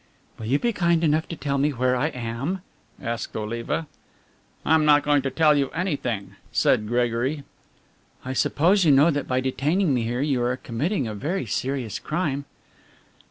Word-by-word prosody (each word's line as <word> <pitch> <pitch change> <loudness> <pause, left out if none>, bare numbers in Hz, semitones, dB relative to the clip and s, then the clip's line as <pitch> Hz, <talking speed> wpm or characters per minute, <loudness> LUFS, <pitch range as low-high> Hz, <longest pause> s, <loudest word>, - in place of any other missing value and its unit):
"Will 110 - -5
you 135 +5 +3
be 235 +8 0
kind 170 -4 +2
enough 155 0 +2
to 170 - -5
tell 140 -2 -2
me 145 +2 +3
where 130 -2 +1
I 130 +4 +1
am?" 125 +7 -4 0.4
asked 115 0 -4
Oliva. 115 +8 -3 0.8
"I - - +3
am 160 -1 +5
not 150 -1 +5
going 145 -1 +3
to 135 - -2
tell 155 +1 +4
you 140 -2 +1
anything," 140 - -2
said 105 - +2
Gregory. 120 +5 0 0.8
"I 130 - -3
suppose 180 +9 +3
you 155 - +5
know 145 +5 +6
that 145 -2 -2
by 130 0 +1
detaining 145 +6 +1
me 125 - +1
here 120 +2 -2
you 140 -4 +1
are 125 +1 0
committing 140 - -2
a 110 - -4
very 145 - -2
serious 125 0 -2
crime?" 150 -4 -2
140 Hz, 175 wpm, -24 LUFS, 120-155 Hz, 0.8 s, know